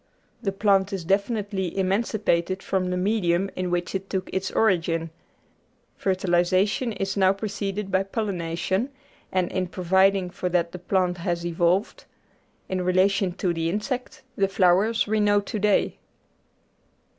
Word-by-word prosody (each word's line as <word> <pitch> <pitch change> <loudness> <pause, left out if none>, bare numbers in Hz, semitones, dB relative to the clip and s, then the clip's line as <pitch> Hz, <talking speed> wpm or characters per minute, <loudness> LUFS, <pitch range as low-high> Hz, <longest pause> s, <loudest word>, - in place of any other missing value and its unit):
The 200 -4 -1
plant 195 0 +2
is 185 -4 -4
definitely 200 -1 -1
emancipated 190 -2 0
from 185 -1 -1
the 180 - -1
medium 190 -1 +1
in 185 -1 -2
which 175 0 -1
it 190 0 -4
took 190 -1 -3
its 190 0 -1
origin; 165 -5 +1 0.8
fertilisation 185 +5 +1
is 195 -1 -3
now 190 -1 +4
pre 205 +2 -4
ceded 200 0 -4
by 190 0 +3
pollination, 195 +1 -2 0.4
and 185 -2 0
in 185 -1 -1
providing 190 +1 +2
for 180 - -3
that 170 -1 +1
the 180 - -7
plant 180 0 0
has 170 -1 -2
evolved, 175 +4 0 0.6
in 185 -1 -2
relation 185 +1 +2
to 180 -1 -1
the 165 0 -1
insect, 245 +7 -4
the 195 - +2
flowers 195 +4 +3
we 215 +1 0
know 205 0 +4
to 205 +1 -4
day. 210 0 +1
190 Hz, 145 wpm, -25 LUFS, 180-200 Hz, 0.8 s, now